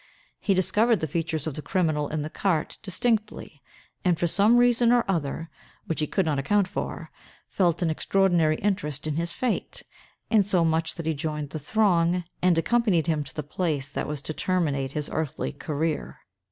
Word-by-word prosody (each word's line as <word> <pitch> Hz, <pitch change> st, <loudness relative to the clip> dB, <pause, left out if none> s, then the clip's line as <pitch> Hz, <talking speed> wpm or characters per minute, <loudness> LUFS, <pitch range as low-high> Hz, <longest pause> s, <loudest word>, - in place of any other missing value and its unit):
He 195 Hz, -, +1 dB
discovered 215 Hz, +5 st, +3 dB
the -, -, -1 dB
features 160 Hz, 0 st, -2 dB
of 160 Hz, -, -3 dB
the 150 Hz, -, -6 dB
criminal 155 Hz, -5 st, 0 dB
in 155 Hz, -1 st, -2 dB
the 155 Hz, -, -4 dB
cart 175 Hz, -6 st, -1 dB
distinctly; 210 Hz, -, -2 dB, 0.4 s
and, 180 Hz, -3 st, +2 dB
for 175 Hz, -, 0 dB
some 205 Hz, +7 st, +4 dB
reason 240 Hz, -1 st, +4 dB
or 245 Hz, -1 st, +4 dB
other, 165 Hz, -3 st, -2 dB, 0.3 s
which 165 Hz, -, -3 dB
he 150 Hz, -, 0 dB
could 190 Hz, -, 0 dB
not 150 Hz, -3 st, 0 dB
account 200 Hz, +8 st, +2 dB
for, -, -, -5 dB, 0.4 s
felt 175 Hz, -2 st, +1 dB
an 165 Hz, -, +1 dB
extraordinary 175 Hz, -2 st, +2 dB
interest 155 Hz, -8 st, -2 dB
in 155 Hz, -2 st, -2 dB
his 170 Hz, +1 st, -1 dB
fate—insomuch 180 Hz, -8 st, 0 dB
that 165 Hz, -, -6 dB
he 160 Hz, -, +1 dB
joined 150 Hz, -1 st, -4 dB
the 155 Hz, -, -4 dB
throng, 180 Hz, 0 st, +2 dB, 0.2 s
and 180 Hz, -2 st, +3 dB
accompanied 200 Hz, -3 st, +2 dB
him 155 Hz, -3 st, 0 dB
to 140 Hz, -, -12 dB
the 150 Hz, -, -3 dB
place 145 Hz, -3 st, -2 dB
that -, -, -3 dB
was 145 Hz, -1 st, -4 dB
to 155 Hz, -, -4 dB
terminate 145 Hz, -7 st, -1 dB
his 150 Hz, -1 st, -2 dB
earthly 155 Hz, -4 st, -2 dB
career. 155 Hz, 0 st, -3 dB
165 Hz, 175 wpm, -26 LUFS, 150-195 Hz, 0.4 s, some